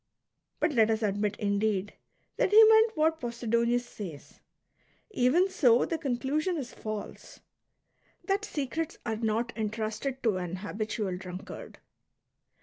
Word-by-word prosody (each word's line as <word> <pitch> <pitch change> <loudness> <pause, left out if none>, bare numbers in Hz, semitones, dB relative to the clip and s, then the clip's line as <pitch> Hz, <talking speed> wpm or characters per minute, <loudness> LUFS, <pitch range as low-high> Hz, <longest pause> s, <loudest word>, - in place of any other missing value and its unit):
But 300 - +1
let 225 -3 +4
us 220 0 0
admit, 205 0 0
indeed, 205 -1 0 0.4
that - - +2
he 430 +3 +9
meant 445 +1 +5
what 320 +1 +2
Posidonius 235 0 0
says; 175 -11 -9 0.7
even 340 +3 +3
so, 245 -10 +4
the 330 - -3
conclusion 295 +5 -1
is 260 -5 -6
false, 215 -1 -7 0.4
— - - -35
that 395 +1 +1
secrets 315 -3 -3
are 220 -2 -2
not 225 +2 -1
entrusted 220 +4 -3
to 215 -5 +2
an 180 -1 -4
habitual 205 -1 -3
drunkard. 180 0 -9
235 Hz, 130 wpm, -29 LUFS, 210-300 Hz, 0.7 s, he